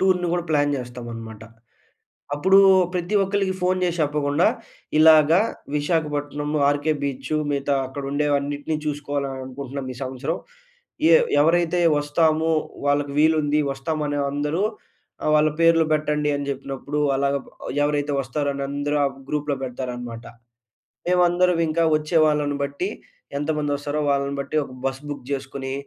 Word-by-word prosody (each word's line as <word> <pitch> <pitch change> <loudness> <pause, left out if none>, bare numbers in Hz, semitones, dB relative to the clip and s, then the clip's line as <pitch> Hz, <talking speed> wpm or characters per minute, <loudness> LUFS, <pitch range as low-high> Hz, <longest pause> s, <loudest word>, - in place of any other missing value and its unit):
టూర్‌ని 185 -2 +2
గూడా 175 -1 0
ప్లాన్ 145 -1 +2
జేస్తామనమాట. 120 -3 -8 0.9
అప్పుడు 190 +6 +4 0.4
ప్రతి 180 +3 -2
ఒక్కలికి 195 -1 0
ఫోన్ 185 +1 +1
జేసి 175 -1 -1
చెప్పకుండా, 145 +1 +1 0.5
ఇలాగా 155 +2 +7 0.4
విశాఖపట్నం 145 -1 -1 0.2
'ఆర్‌కే 145 +2 +1
బీచు' 140 +1 -2
మిగతా 140 0 0
అక్కడ 135 +2 -7
ఉండేవన్నిటిని 145 +1 0
చూసుకోవాలి 145 -1 -2
అని 130 0 -6
అనుకుంటున్నాం 135 0 -6
ఈ - - -13
సంవత్సరం. 135 +6 -3 0.7
ఎ - - +7 0.3
ఎవరైతే 170 +2 +2 0.2
వస్తాము 155 +2 +1 0.4
వాళ్ళకి 145 0 +1
వీలుంది 150 -1 +3
వస్తామనే 145 +1 -2
అందరూ 150 +5 -1 0.6
ఆహ్, - - +1
వాళ్ళ 150 0 +4
పేర్లు 165 -1 +5
పెట్టండి 150 -1 0
అని 140 0 -4
జెప్పినప్పుడు, 140 +1 -4 0.2
అలాగా 140 +1 +1
బ్ - - -16 0.4
ఎవరైతే 145 0 0
వస్తారని 140 +2 -2
అందరూ 145 +1 -1
ఆ - - +3 0.2
గ్రూప్‌లో 150 -1 -1
పెడతారనమాట. 120 -2 -6 0.8
మేవందరం 180 0 +3
ఇంక 155 +2 -1 0.2
వచ్చే 155 +2 -1
వాళ్ళను 145 -1 0
బట్టి 140 +7 -3 0.5
ఎంతమంది 150 0 -1
వస్తారో, 145 +1 -3
వాళ్ళని 140 0 0
బట్టి 140 - -4
ఒక 135 - -11
బస్ 135 0 -1
బుక్ 145 -3 -6
జేసుకొని, 135 -1 -4
145 Hz, 130 wpm, -23 LUFS, 140-155 Hz, 0.9 s, ఇలాగా